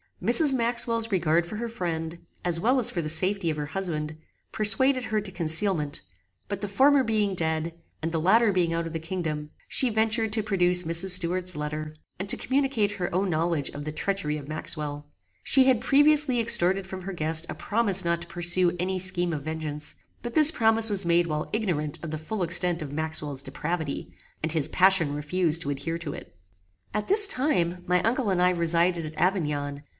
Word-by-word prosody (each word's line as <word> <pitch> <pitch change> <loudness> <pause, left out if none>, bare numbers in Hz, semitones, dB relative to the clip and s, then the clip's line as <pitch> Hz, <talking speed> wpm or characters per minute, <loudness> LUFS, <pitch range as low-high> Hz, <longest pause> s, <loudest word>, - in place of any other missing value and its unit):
Mrs. 300 -5 +3
Maxwell's 230 -2 0
regard 170 -2 +1
for 195 - -8
her 235 +2 -4
friend, 170 -5 -5 0.3
as 170 -1 0
well 250 +7 +1
as 240 - +2
for 175 - -3
the 155 - -4
safety 185 +3 +4
of 155 - -3
her 150 -1 -4
husband, 155 -2 -5 0.3
persuaded 255 +5 +1
her 215 0 -1
to 205 -2 -6
concealment; 160 -3 -1 0.5
but 200 -1 -5
the 205 - -2
former 270 +7 +3
being 215 -4 0
dead, 160 -1 -1 0.3
and 165 - -2
the 160 -1 -2
latter 215 +5 +3
being 180 -3 0
out 165 0 -2
of 165 - -7
the 165 - -3
kingdom, 160 -3 -5 0.2
she 260 - +2
ventured 220 0 0
to 220 -1 +3
produce 180 -3 +2
Mrs. 170 +3 +1
Stuart's 180 0 +1
letter, 150 +1 -5 0.2
and 195 +1 -5
to - - +3
communicate 260 -6 -1
her 180 -4 -5
own 190 +1 -1
knowledge 160 -3 -1
of 145 - -8
the 155 - -5
treachery 155 -2 -2
of 145 -2 -10
Maxwell. 150 -1 -5 0.4
She 265 -1 +3
had 255 -3 +2
previously 290 -1 +3
extorted 195 -4 +3
from 190 -1 -8
her 195 +1 -6
guest 160 0 +3
a - - -5
promise 200 -4 +1
not 170 0 -1
to 175 - -8
pursue 175 +1 0
any 185 +1 -2
scheme 175 -2 +1
of 145 -3 -5
vengeance; 155 -1 -6 0.3
but 240 -1 -7
this 310 0 +9
promise 225 -3 +4
was 200 -3 +3
made 170 0 +2
while 155 -1 -4
ignorant 170 -9 -2
of 160 - -6
the 155 - -4
full 190 +5 -4
extent 170 0 +2
of 140 - -8
Maxwell's 150 -2 -3
depravity, 150 +2 -5 0.3
and 160 - -1
his 155 -3 +2
passion 185 -6 +3
refused 165 +2 -1
to 145 - -3
adhere 165 +4 -4
to 160 -4 -6
it. 85 - -11 0.6
At 210 - -3
this 410 +1 +7
time 180 - 0
my 180 0 +1
uncle 230 0 0
and 185 -2 0
I 180 0 +3
resided 170 0 0
at 155 - -10
Avignon. 150 -6 -2
175 Hz, 195 wpm, -25 LUFS, 160-210 Hz, 0.6 s, this